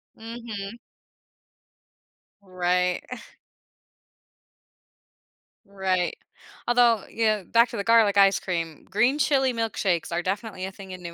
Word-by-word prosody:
Mhm. 225 -2 -7 1.6
Right, 180 -1 0
uh 250 - -5 2.5
Right, 190 -2 -1 0.5
although, 240 -3 +3
you 230 - -2
know, 215 -3 +1
back 235 +5 +3
to 235 - -6
the 200 - -2
garlic 215 -2 +4
ice 195 0 +5
cream, 165 -4 -4
green 240 +9 +2
chili 265 -4 +2
milkshakes 210 -6 -1
are 170 +1 -1
definitely 195 0 -3
a 190 - -6
thing 195 -1 -11
in 185 -1 -9
New 170 -1 -7
200 Hz, 120 wpm, -25 LUFS, 185-230 Hz, 2.5 s, ice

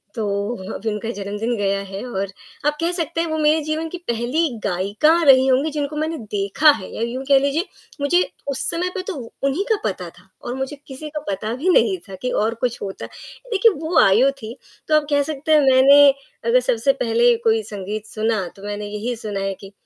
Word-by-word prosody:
तो 220 - -2 0.5
अभी 220 +2 -3
उनका 210 +2 -4
जन्मदिन 205 +3 -3
गया 200 -1 0
है 195 +3 -7
और 200 -5 -3 0.4
आप 295 0 +2
कह 335 +1 +1
सकते 330 -2 -2
हैं 335 - -1
वो 315 0 -2
मेरे 310 +1 +3
जीवन 310 +1 -2
की 360 - -6
पहली 240 +8 0 0.2
गायिका 200 - +2 0.2
रही 265 -1 +7
होंगी, 270 +4 +2
जिनको 295 0 -3
मैंने 315 +1 -2
देखा 200 +9 +3
है 190 -9 -6
या - - -5
यूँ 240 +3 -3
कह 275 -1 +7
लीजिए 280 +6 0 0.4
मुझे 315 +6 +3 0.3
उस 265 - -3
समय 355 +2 -1
पे 380 - -2
तो 395 - -3 0.3
उन्हीं 275 +8 +1
का - - +5
पता 180 -3 -3
था 190 - -24
और 245 - -5
मुझे 265 +2 -4
किसी 280 +3 -8
का 300 0 -4
पता 205 +3 -3
भी 330 +8 -1
नहीं 375 +1 +4
था, 190 - -7
कि 250 +7 -4
और 220 +2 +1
कुछ 245 +1 -3
होता 195 -1 -5 0.5
देखिए 445 +2 +5
वो 320 +1 +2
आयु 230 +8 +5
थी, 240 -3 -9 0.3
तो 310 - +3
आप 305 -1 +2
कह 285 0 +3
सकते 305 +1 -4
हैं 305 - +6
मैंने 280 +2 +7 0.4
अगर 235 +2 +4
सबसे 250 +1 +1
पहले 235 +1 +4
कोई 220 -1 +3
संगीत 205 +2 -5
सुना, 215 -4 -1
तो 195 - -15
मैंने 205 0 -4
यही 210 +4 -4
सुना 210 -3 -5
है 195 0 -2
कि 195 -1 -11
250 Hz, 210 wpm, -21 LUFS, 210-300 Hz, 0.5 s, रही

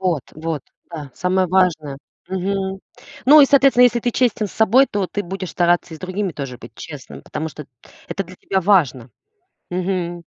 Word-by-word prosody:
Вот 175 -7 0
вот, 160 -2 -4 0.3
да, 150 -4 -7
самое 185 +1 +1
важное. 160 -7 +1 0.3
Мгм. 190 +1 -2 0.4
Ну, 295 +3 +8
и, 275 - +8
соответственно, 270 -3 +5
если 240 -1 +3
ты 240 - 0
честен 235 -3 +1
с - - -12
собой, 230 +5 +4
то 200 -5 -2
ты 205 - -3
будешь 185 0 -6
стараться 175 -1 +1
и - - -8
с - - -20
другими 185 0 -3
тоже 135 -4 -6
быть 115 - -12
честным, 145 0 -10
потому 155 +1 -5
что 150 0 -10 0.4
это 195 - -2
для 185 +1 -13
тебя 190 +1 -1
важно. 155 - +2 0.6
Мгм. 175 -1 -2
185 Hz, 180 wpm, -20 LUFS, 160-200 Hz, 0.6 s, Ну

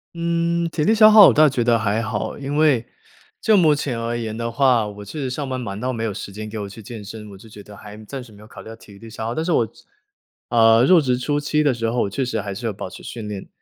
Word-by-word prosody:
嗯， 170 0 0
体 155 - -2
力 220 - +3
消 215 -1 +7
耗 215 -2 +9
我 - - +2
倒 155 0 +5
觉 130 -3 0
得 115 -1 +2
还 110 +1 0
好， 110 -3 -4
因 140 +1 -4
为， 145 -7 +3 0.5
就 220 - +3
目 160 -6 +5
前 140 -5 -3
而 115 +1 -3
言 110 -2 -5
的 115 0 -3
话， 125 -3 +2
我 105 0 -9
确 155 - -8
实 130 - -2
上 140 +2 -4
班 130 - -3
忙 105 -4 -6
到 130 +2 -2
没 115 - -4
有 110 -2 -2
时 100 - -8
间 110 +1 -7
给 110 - -6
我 100 - -5
去 105 +3 -12
健 110 0 -9
身， 105 +1 -9
我 100 - -12
就 110 - -15
觉 105 -1 -13
得 105 0 -14
还 105 0 -11
暂 135 +5 -7
时 120 -3 -14
没 105 - -16
有 105 - -14
考 - - -13
虑 - - -14
到 115 - -9
体 100 -3 -16
力 115 - -12
消 110 0 -7
耗。 115 - -3
但 160 - -2
是 175 - 0
我 115 - +2
职 - - -19 0.6
呃， 115 0 +5
入 175 +5 +6
职 125 -4 0
初 145 +3 -1
期 150 +1 0
的 145 -3 +2
时 115 -1 -2
候， 115 -3 -1
确 130 +7 -2
实 115 -4 -2
还 100 -1 -5
是 115 +5 -7
有 110 - -1
保 95 - -7
持 - - -12
训 110 -3 -7
练， 100 -2 -7
115 Hz, 320 characters per minute, -21 LUFS, 105-145 Hz, 0.6 s, 耗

